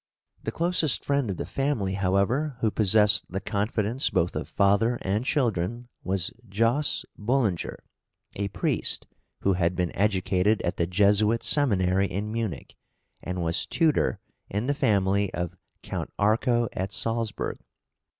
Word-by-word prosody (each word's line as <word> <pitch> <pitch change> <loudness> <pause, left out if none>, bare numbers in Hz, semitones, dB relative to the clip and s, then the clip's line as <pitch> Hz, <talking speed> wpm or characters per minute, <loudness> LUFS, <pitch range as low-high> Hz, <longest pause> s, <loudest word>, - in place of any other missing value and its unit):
The - - -4
closest 165 -4 +2
friend 140 -5 0
of 95 - -3
the - - -4
family, 135 -9 -1
however, 100 +9 0
who 110 - +2
possessed 105 0 +4
the 95 - -2
confidence 105 +4 0
both 85 +2 0
of - - -3
father 100 +5 +2
and 100 +4 0
children, 120 - -1
was 95 -2 -1 0.2
Jos. 115 +8 +1
Bullinger, 110 -5 0 0.6
a 100 0 -2
priest, 95 - +1 0.4
who 100 - +2
had 90 0 0
been 90 -1 -2
educated 100 +1 +1
at 85 - -2
the 85 - 0
Jesuit 105 +4 +3
seminary 100 -9 +2
in 100 +4 -4
Munich 110 -5 -4 0.5
and 90 -1 -4
was 85 0 0
tutor 160 -3 +1 0.3
in 105 +4 -2
the 140 - +1
family 100 -6 +1
of 85 -1 -4 0.3
Count - - -5
Arco 115 +3 +2
at 95 +2 -3
Salzburg. 115 0 -2
105 Hz, 140 wpm, -26 LUFS, 95-120 Hz, 0.6 s, possessed